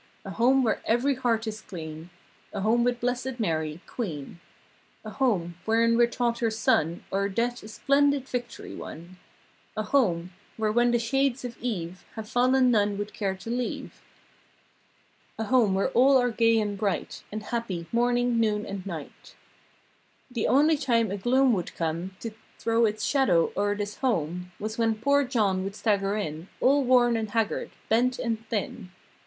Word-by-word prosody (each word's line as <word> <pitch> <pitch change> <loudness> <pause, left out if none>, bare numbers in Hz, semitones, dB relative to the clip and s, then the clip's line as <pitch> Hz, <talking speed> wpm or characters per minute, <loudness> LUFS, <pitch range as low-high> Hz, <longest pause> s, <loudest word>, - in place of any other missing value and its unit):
A 195 - -5
home 255 +6 +3
where 225 - 0
every 245 +5 +2
heart 235 -3 0
is 215 0 -5
clean. 160 -2 -8 0.4
A 200 - -3
home 230 +4 +3
with 245 0 +1
Blessed 250 +1 -2
Mary, 160 -5 -1
queen. 170 - -5 0.7
A 215 - -6
home, 195 -8 0
wherein 230 +1 +3
we're 240 0 +5
taught 235 0 -1
her 230 - +1
Son 170 -6 +1
O'er 200 +1 +1
Death 240 +5 -1
a - - -10
splendid 280 +4 +2
victory 245 -2 -5
won. 170 +3 -9 0.6
A 215 - 0
home, 185 -8 +1 0.3
where, 215 -1 +1
when 240 +2 +3
the 240 - +3
shades 265 +2 0
of 240 -1 -6
eve 185 -7 -4
Have 220 -1 -6
fallen 255 +2 +3
none 205 -3 +2
would 205 0 -5
care 195 -3 -2
to 210 +5 -7
leave. 245 0 -4 1.4
A 225 - -2
home 225 -4 +3
where 195 +6 +1
all 265 +2 +5
are 245 -1 +2
gay 230 0 +3
and 205 -2 -2
bright 205 -3 -2
And 215 +1 -5
happy, 205 -7 -3
morning, 245 0 +2
noon 210 -2 +1
and 195 -2 -6
night. 160 -6 -8 1.0
The 235 -3 -1
only 300 +4 +4
time 230 -7 +1
a 200 - -2
gloom 255 +5 +3
would 180 -5 -3
come 170 +3 -3
To 230 - -4 0.3
throw 230 0 +2
it's 215 +1 -3
shadow 190 - +3
o'er 205 +1 +1
this 205 0 -4
home 180 - -1
Was 215 +2 -4
when 225 -1 +2
poor 280 +6 +2
John 210 -7 +1
would 195 +1 -5
stagger 205 -2 +1
in 160 -4 -4
All 280 +2 +4
worn 245 -2 +4
and 220 -1 -2
haggard; 225 -1 -1 0.2
bent 245 +3 +2
and 225 -2 -2
thin. 210 -2 -3
225 Hz, 170 wpm, -27 LUFS, 195-245 Hz, 1.4 s, we're